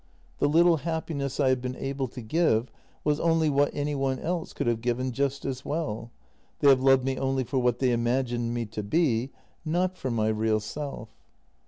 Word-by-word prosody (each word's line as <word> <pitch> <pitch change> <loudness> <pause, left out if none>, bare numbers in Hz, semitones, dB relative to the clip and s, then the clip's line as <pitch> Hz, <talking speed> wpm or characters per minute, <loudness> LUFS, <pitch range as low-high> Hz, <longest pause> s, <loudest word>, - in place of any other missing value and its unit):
The 145 - +3
little 170 +2 +5
happiness 150 -3 -3
I 135 -2 +4
have 130 -1 +1
been 130 0 -4
able 135 0 -3
to 125 0 -9
give 120 -3 +1 0.3
was 150 0 +1
only 165 -2 +2
what 145 +1 +3
any 145 0 -2
one 135 -2 0
else 170 +3 -3
could - - -3
have 115 -1 0
given 125 +2 -1
just 140 +2 -1
as 130 -1 -3
well; 145 -7 -3 0.5
they 145 - +5
have 130 -2 +6
loved 135 -1 +5
me 135 -1 -1
only 135 0 0
for 130 +2 -1
what 125 -1 +2
they 130 -1 +2
imagined 120 0 0
me 120 -1 -2
to 110 0 -5
be, 125 +1 +1 0.3
not 180 +3 0
for 130 - -2
my 110 -2 +1
real 110 0 +1
self. 125 +1 -6
135 Hz, 195 wpm, -27 LUFS, 120-145 Hz, 0.5 s, have